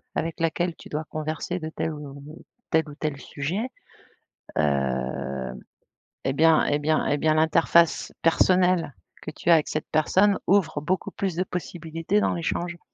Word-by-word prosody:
avec 165 Hz, 0 st, -2 dB
laquelle 165 Hz, +1 st, 0 dB
tu -, -, -12 dB
dois 150 Hz, +1 st, -3 dB
converser 155 Hz, +3 st, -3 dB
de 155 Hz, -, -5 dB
tel 160 Hz, 0 st, -3 dB
ou 140 Hz, -2 st, -9 dB, 0.5 s
tel 160 Hz, -1 st, +2 dB
ou 145 Hz, -, -9 dB
tel 150 Hz, -2 st, -3 dB
sujet, 175 Hz, -, -3 dB, 0.9 s
hem 65 Hz, -2 st, -1 dB, 0.7 s
et 135 Hz, -, +1 dB
bien 160 Hz, +2 st, +5 dB
et 145 Hz, -, +1 dB
bien 155 Hz, +1 st, +1 dB
et 145 Hz, -, +1 dB
bien 155 Hz, +1 st, +2 dB
l'interface 165 Hz, +1 st, +3 dB
personnelle 180 Hz, -3 st, +3 dB, 0.3 s
que -, -, -6 dB
tu -, -, -2 dB
as -, -, +9 dB
avec 155 Hz, -2 st, +2 dB
cette 155 Hz, -, -4 dB
personne 190 Hz, +6 st, +3 dB
ouvre 175 Hz, -6 st, +2 dB
beaucoup 180 Hz, +6 st, -1 dB
plus 190 Hz, -4 st, -2 dB
de 185 Hz, -, +1 dB
possibilités 170 Hz, +2 st, -2 dB
dans -, -, +2 dB
l'échange. 170 Hz, +1 st, -2 dB
160 Hz, 160 wpm, -25 LUFS, 145-175 Hz, 0.9 s, as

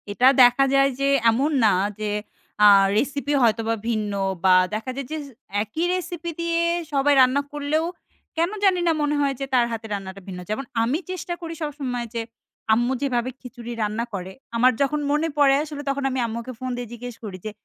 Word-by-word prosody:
এটা 205 Hz, +5 st, +1 dB, 0.2 s
দেখা 245 Hz, +2 st, +6 dB
যায় 275 Hz, 0 st, +5 dB
যে 275 Hz, -, +1 dB, 0.2 s
এমন 270 Hz, +7 st, +1 dB
না -, -, +6 dB, 0.3 s
যে 215 Hz, -1 st, -2 dB, 0.6 s
আ -, -, +10 dB, 0.3 s
রেসিপি 285 Hz, +3 st, -1 dB
হয়তোবা 225 Hz, -1 st, +2 dB
ভিন্ন 215 Hz, -3 st, -1 dB, 0.3 s
বা 185 Hz, -, +7 dB, 0.2 s
দেখা 220 Hz, +4 st, -3 dB
যায় 275 Hz, -2 st, -5 dB
যে, 315 Hz, -, -2 dB, 0.5 s
একই 310 Hz, +11 st, -3 dB
রেসিপি 350 Hz, -2 st, -4 dB
দিয়ে 335 Hz, 0 st, 0 dB, 0.3 s
সবাই 285 Hz, +1 st, +3 dB
রান্না 260 Hz, +2 st, +4 dB
করলেও, 295 Hz, +2 st, -1 dB, 0.5 s
কেন 335 Hz, +2 st, +2 dB
জানি 380 Hz, -2 st, +4 dB
না -, -, +5 dB
মনে 295 Hz, 0 st, +1 dB
হয় 280 Hz, -1 st, +1 dB
যে 275 Hz, -, -2 dB
তার 245 Hz, -2 st, +4 dB
হাতে 225 Hz, -1 st, -5 dB
রান্নাটা 195 Hz, -1 st, -6 dB
ভিন্ন। 180 Hz, -2 st, -6 dB
যেমন 265 Hz, +6 st, -2 dB, 0.2 s
আমি 255 Hz, +8 st, 0 dB
চেষ্টা 360 Hz, -1 st, -4 dB
করি 330 Hz, -1 st, -5 dB
সবসময় 275 Hz, -5 st, -3 dB
যে 230 Hz, -, -2 dB, 0.5 s
আম্মু 240 Hz, +3 st, +2 dB
যেভাবে 255 Hz, -3 st, 0 dB
খিচুড়ি 240 Hz, -1 st, -9 dB
রান্না 215 Hz, +2 st, -1 dB
করে। 190 Hz, -1 st, -5 dB, 0.2 s
আমার 250 Hz, +2 st, +5 dB
যখন 280 Hz, +2 st, +1 dB
মনে 300 Hz, +2 st, +1 dB
পড়ে 275 Hz, -2 st, +5 dB
আসলে 295 Hz, -2 st, -7 dB
তখন 275 Hz, 0 st, -1 dB
আমি 260 Hz, 0 st, -2 dB
আম্মুকে 235 Hz, +3 st, -5 dB
ফোন 255 Hz, -, -4 dB
দিয়ে 245 Hz, -1 st, -5 dB
জিজ্ঞেস 240 Hz, 0 st, -7 dB
করি 200 Hz, -4 st, -6 dB
যে, 215 Hz, -, -3 dB
255 Hz, 185 wpm, -23 LUFS, 230-290 Hz, 0.6 s, আ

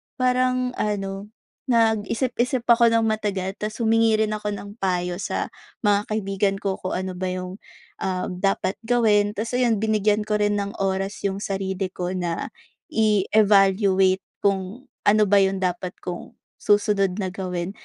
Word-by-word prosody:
parang 255 Hz, 0 st, +1 dB
ano, 195 Hz, -1 st, -2 dB, 0.4 s
nag-isip-isip 235 Hz, +3 st, +1 dB
ako 235 Hz, -1 st, +6 dB
ng 230 Hz, 0 st, +3 dB
matagal 200 Hz, -3 st, -1 dB
tapos 215 Hz, +2 st, -5 dB
humingi 225 Hz, -1 st, +3 dB
rin 215 Hz, -, -3 dB
ako 210 Hz, 0 st, -4 dB
ng 200 Hz, 0 st, -7 dB
payo 180 Hz, -2 st, 0 dB
sa -, -, -2 dB, 0.4 s
mga 205 Hz, 0 st, +3 dB
kaibigan 195 Hz, -2 st, 0 dB
ko 195 Hz, -1 st, -1 dB
kung 185 Hz, -, -3 dB
ano 185 Hz, 0 st, -4 dB
ba 185 Hz, +1 st, -2 dB
yung, 185 Hz, +2 st, -6 dB, 0.4 s
um, 185 Hz, -1 st, -2 dB
dapat 195 Hz, -1 st, +1 dB
gawin. 215 Hz, -4 st, +3 dB
Tapos 225 Hz, +4 st, -3 dB
ayon, 240 Hz, -3 st, +2 dB
binigyan 210 Hz, -1 st, +1 dB
ko 210 Hz, -, +1 dB
rin 205 Hz, 0 st, +2 dB
ng 200 Hz, 0 st, -3 dB
oras 195 Hz, +1 st, -2 dB
yung 195 Hz, -1 st, 0 dB
sarili 195 Hz, -1 st, -2 dB
ko 180 Hz, 0 st, -3 dB
na 175 Hz, -2 st, -3 dB, 0.4 s
i-evaluate 195 Hz, -2 st, +3 dB, 0.2 s
kung 200 Hz, +4 st, -1 dB, 0.2 s
ano 215 Hz, +1 st, +5 dB
ba 205 Hz, -, +5 dB
iyon 195 Hz, 0 st, +1 dB
dapat 180 Hz, 0 st, -2 dB
kong, 175 Hz, -1 st, -6 dB, 0.3 s
susunod 205 Hz, -2 st, +2 dB
na 190 Hz, -, -2 dB
gawin. 180 Hz, -1 st, -3 dB
200 Hz, 150 wpm, -23 LUFS, 190-215 Hz, 0.4 s, ako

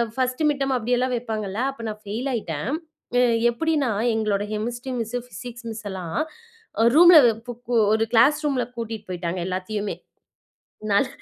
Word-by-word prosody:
First 255 Hz, +3 st, -1 dB
midterm 275 Hz, -2 st, 0 dB
அப்படில்லாம் 245 Hz, +2 st, 0 dB
வைப்பாங்கள்ல. 215 Hz, -2 st, -3 dB
அப்ப 235 Hz, -4 st, -10 dB
நான் 210 Hz, 0 st, -7 dB
ஃபெயில் 225 Hz, +7 st, -3 dB
ஆயிட்டேன். 170 Hz, -, -3 dB, 0.5 s
அ -, -, +5 dB, 0.3 s
எப்படினா, 290 Hz, 0 st, 0 dB, 0.2 s
எங்களோட 210 Hz, -2 st, 0 dB
கெமிஸ்ட்ரி 240 Hz, +4 st, -4 dB
மிஸ், 230 Hz, +2 st, -3 dB
பிசிக்ஸ் 240 Hz, -1 st, -9 dB
மிஸ் 220 Hz, -1 st, -8 dB
எல்லாம் 185 Hz, -, -4 dB, 0.8 s
ரூம்ல 345 Hz, 0 st, +9 dB, 0.3 s
பு 245 Hz, -, -4 dB, 0.2 s
பு 245 Hz, -, -1 dB, 0.2 s
ஒரு 220 Hz, 0 st, +2 dB
கிளாஸ் 275 Hz, +6 st, +5 dB
ரூம்ல 270 Hz, -4 st, +1 dB
பூட்டிட்டு 225 Hz, -3 st, -6 dB
போயிட்டாங்க 175 Hz, 0 st, -3 dB
எல்லாத்தையுமே. 200 Hz, +3 st, -3 dB, 1.0 s
நல் 255 Hz, +7 st, +3 dB
230 Hz, 140 wpm, -24 LUFS, 210-255 Hz, 1.0 s, ரூம்ல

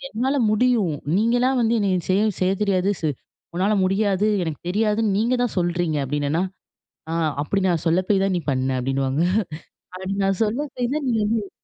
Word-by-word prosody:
"என்னால 260 Hz, +5 st, -1 dB, 0.2 s
முடியும். 215 Hz, -8 st, +2 dB, 0.2 s
நீங்கலா 240 Hz, +4 st, +2 dB
வந்து 230 Hz, +1 st, +2 dB
என்ன 200 Hz, -1 st, +1 dB, 0.2 s
செய்ய, 195 Hz, +2 st, +3 dB, 0.2 s
செய்ய 185 Hz, +1 st, +3 dB
தெரியாது. 195 Hz, 0 st, +1 dB
சு 155 Hz, -, +1 dB, 0.5 s
உன்னால 200 Hz, +4 st, +2 dB
முடியாது, 195 Hz, +1 st, +1 dB, 0.2 s
எனக்கு 160 Hz, -3 st, -5 dB
தெரியாதுன்னு 210 Hz, 0 st, +1 dB
நீங்க 235 Hz, +3 st, +1 dB
தான் 225 Hz, -, -4 dB
சொல்றீங்க!" 175 Hz, -3 st, 0 dB
அப்பிடினேன்னா! 145 Hz, +5 st, -1 dB, 0.7 s
ஆ -, -, -3 dB, 0.3 s
அப்பிடி 195 Hz, +5 st, -1 dB
நான் 170 Hz, -1 st, -1 dB
சொல்ல 165 Hz, +2 st, +3 dB
போய் 195 Hz, -2 st, +3 dB
தான் 195 Hz, -1 st, +1 dB
நீ 175 Hz, -, -2 dB
பண்ண! 130 Hz, 0 st, 0 dB
அப்பிடின்னுவாங்க. 135 Hz, +3 st, 0 dB, 0.7 s
அப்பிடி 190 Hz, +1 st, -4 dB
நான் 195 Hz, -1 st, 0 dB
சொல்ல 230 Hz, +7 st, -2 dB
போய் 250 Hz, +2 st, -1 dB
தான் 290 Hz, -4 st, -2 dB
நீ -, -, +1 dB
வந்து 210 Hz, -1 st, -1 dB
195 Hz, 170 wpm, -22 LUFS, 170-220 Hz, 0.7 s, செய்ய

